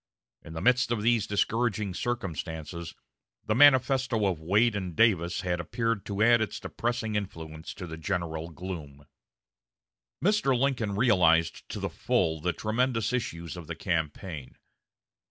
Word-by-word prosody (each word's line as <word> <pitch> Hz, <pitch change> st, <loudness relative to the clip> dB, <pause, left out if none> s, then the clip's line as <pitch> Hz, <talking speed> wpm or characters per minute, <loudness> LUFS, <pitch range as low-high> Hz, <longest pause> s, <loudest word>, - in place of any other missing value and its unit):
In 80 Hz, -, -11 dB
the 80 Hz, -, -5 dB
midst 125 Hz, 0 st, +3 dB
of 110 Hz, -3 st, 0 dB
these 115 Hz, -2 st, +2 dB
discouraging 105 Hz, -1 st, 0 dB
circumstances 85 Hz, -, -4 dB, 0.5 s
the 110 Hz, -, +1 dB
manifesto 130 Hz, -3 st, +4 dB
of 90 Hz, -5 st, -1 dB
Wade 105 Hz, +7 st, +3 dB
and 90 Hz, -4 st, -4 dB
Davis 90 Hz, -6 st, +3 dB
had 90 Hz, -1 st, -1 dB
appeared 115 Hz, +3 st, -2 dB
to 100 Hz, +1 st, 0 dB
add 120 Hz, 0 st, +5 dB
its 110 Hz, -, -2 dB
depressing 115 Hz, -2 st, -3 dB
influence 80 Hz, -6 st, -5 dB
to 95 Hz, -, -6 dB
the 80 Hz, -2 st, -7 dB
general 80 Hz, -2 st, -3 dB
gloom. 80 Hz, -5 st, -8 dB, 1.1 s
Mr. 185 Hz, -10 st, +2 dB
Lincoln 120 Hz, -6 st, 0 dB
realized 85 Hz, -8 st, +3 dB
to -, -, -5 dB
the -, -, -2 dB
full 80 Hz, -3 st, 0 dB
the 90 Hz, +2 st, +1 dB
tremendous 115 Hz, +4 st, 0 dB
issues 85 Hz, -9 st, -3 dB
of 85 Hz, -3 st, -9 dB
the 85 Hz, -, -5 dB
campaign. 80 Hz, -3 st, -3 dB
100 Hz, 140 wpm, -28 LUFS, 85-120 Hz, 1.1 s, add